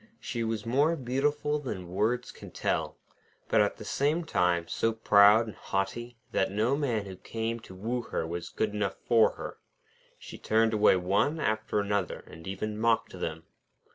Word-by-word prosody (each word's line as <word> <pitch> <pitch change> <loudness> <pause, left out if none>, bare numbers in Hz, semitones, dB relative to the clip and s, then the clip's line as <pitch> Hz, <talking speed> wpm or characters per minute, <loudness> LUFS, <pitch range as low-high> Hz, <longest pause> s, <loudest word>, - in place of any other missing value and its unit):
She 120 -2 -3
was 110 -1 -2
more 145 +8 +3
beautiful 145 +2 0
than 95 -11 -5
words 110 +6 0
can - - -11
tell, - - -2 0.5
but - - +4
at - - +1
the - - -9
same 150 +5 +1
time 90 - +1
so 115 +6 0
proud 105 0 +6
and 110 - -8
haughty 115 +5 -3
that 95 - +1
no 110 +7 +1
man 120 -8 -1
who 95 -1 -8
came 115 +4 -4
to 95 -4 -13
woo 115 +6 -2
her 110 - -3
was 85 +1 -5
good 105 -1 -1
enough 105 -2 -1
for 115 -2 +5
her. - - -8 0.6
She - - -11
turned 110 +1 +2
away 105 -2 +5
one 100 - +1
after 110 -5 0
another, 100 -3 -1
and 80 +2 -12
even 105 +2 -4
mocked 115 0 +2
them. 80 -3 -5
110 Hz, 170 wpm, -29 LUFS, 95-120 Hz, 0.6 s, proud